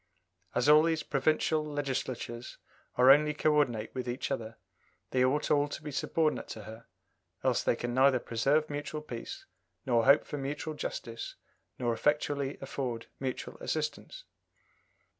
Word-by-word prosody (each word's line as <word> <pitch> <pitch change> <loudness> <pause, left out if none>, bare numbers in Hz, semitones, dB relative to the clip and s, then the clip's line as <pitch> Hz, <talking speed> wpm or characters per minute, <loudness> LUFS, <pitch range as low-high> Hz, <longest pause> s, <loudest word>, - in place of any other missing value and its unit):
As 125 +3 +2
all 150 +1 +8
these 160 0 +1
provincial 155 +2 +1
Legislatures 130 -5 -4 0.4
are 125 +2 +7
only 150 +1 +5
co 155 +1 +2
ordinate 120 -8 +1
with 130 -1 -4
each 125 +3 -3
other, 115 -4 -4 0.5
they 130 -1 +3
ought 135 +4 +1
all 145 -1 +4
to 145 - -7
be 150 - -5
subordinate 155 +2 0
to 110 - -7
her, 110 +2 -11 0.6
else - - +2
they - - +2
can 120 0 -3
neither 130 +1 +5
preserve 135 +7 +1
mutual 150 +1 -4
peace, 120 -6 -7 0.4
nor 115 -3 +3
hope 140 - +6
for 145 - -5
mutual 145 +3 -3
justice, 115 -5 -5 0.4
nor 120 -2 0
effectually 145 +1 0
afford 130 -4 -4
mutual 130 -1 -4
assistance." 155 - -3
140 Hz, 145 wpm, -31 LUFS, 120-150 Hz, 0.6 s, all